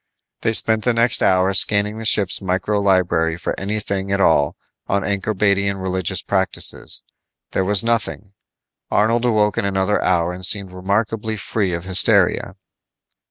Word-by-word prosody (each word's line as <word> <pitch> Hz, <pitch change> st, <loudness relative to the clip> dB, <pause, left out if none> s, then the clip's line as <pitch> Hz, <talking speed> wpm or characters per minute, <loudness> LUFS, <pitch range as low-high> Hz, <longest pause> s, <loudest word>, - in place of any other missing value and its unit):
They 110 Hz, -, 0 dB
spent 110 Hz, -1 st, +3 dB
the 120 Hz, -2 st, +1 dB
next 115 Hz, +1 st, +3 dB
hour 95 Hz, +1 st, +2 dB
scanning 105 Hz, +2 st, +1 dB
the 115 Hz, -, -7 dB
ship's 100 Hz, -3 st, +2 dB
micro 95 Hz, +2 st, -1 dB
library 90 Hz, -4 st, +1 dB
for -, -, -3 dB
anything 100 Hz, -1 st, -3 dB
at 100 Hz, -, 0 dB
all 80 Hz, -4 st, +2 dB, 0.3 s
on 100 Hz, 0 st, 0 dB
Ankorbadian 100 Hz, -1 st, 0 dB
religious 95 Hz, -1 st, -3 dB
practices. 95 Hz, -3 st, -3 dB, 0.5 s
There 95 Hz, -, 0 dB
was 100 Hz, +1 st, +4 dB
nothing. 110 Hz, -3 st, -2 dB, 0.6 s
Arnold 115 Hz, +3 st, +1 dB
awoke 105 Hz, -4 st, +1 dB
in -, -, -2 dB
another 95 Hz, +1 st, 0 dB
hour 85 Hz, +1 st, +1 dB
and 90 Hz, +1 st, -9 dB
seemed 100 Hz, 0 st, +2 dB
remarkably 105 Hz, +4 st, -2 dB
free 100 Hz, 0 st, -2 dB
of 85 Hz, 0 st, -4 dB
hysteria. 95 Hz, -2 st, +2 dB
100 Hz, 145 wpm, -19 LUFS, 95-105 Hz, 0.6 s, was